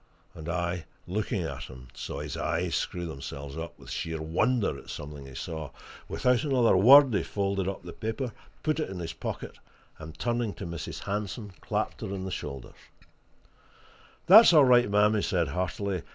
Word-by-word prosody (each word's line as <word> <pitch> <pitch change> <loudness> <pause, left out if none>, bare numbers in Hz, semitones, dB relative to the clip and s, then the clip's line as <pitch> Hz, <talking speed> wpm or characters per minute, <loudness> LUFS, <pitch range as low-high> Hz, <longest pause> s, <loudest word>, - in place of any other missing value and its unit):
And 80 +1 -8
I, 85 -1 -2 0.2
looking 100 0 -2
at 80 - -5
him, 65 -1 -12
saw - - -6
his - - -5
eyes 85 +1 -1
screw 90 -1 -2
themselves 70 -2 -7
up 80 0 -6
with - - -12
sheer 80 -1 -3
wonder 100 - +1
at - - -12
something 75 -2 -7
he 65 - -11
saw. 80 0 -5 0.4
Without 125 +1 +2
another 130 -8 +3
word 130 +6 +8
he 100 - +2
folded 100 -2 -1
up 95 -2 -4
the 85 - -8
paper, 115 +3 -3 0.3
put 155 0 0
it 155 - -2
in 95 - -6
his 85 -2 -5
pocket, - - -6 0.4
and 80 0 -9
turning 120 -1 -1
to 100 - -7
Mrs. 85 -1 -6
Hanson, 105 +1 -4
clapped - - -2
her - - -3
on 95 -1 -4
the 95 - -4
shoulder. 70 -7 -6 1.5
"That's 215 +1 +9
all 150 -4 +8
right, 125 -2 +5
ma'am!" 105 +1 +4
he 105 - +1
said 85 -7 0
heartily. 90 +3 -2
95 Hz, 180 wpm, -28 LUFS, 80-110 Hz, 1.5 s, That's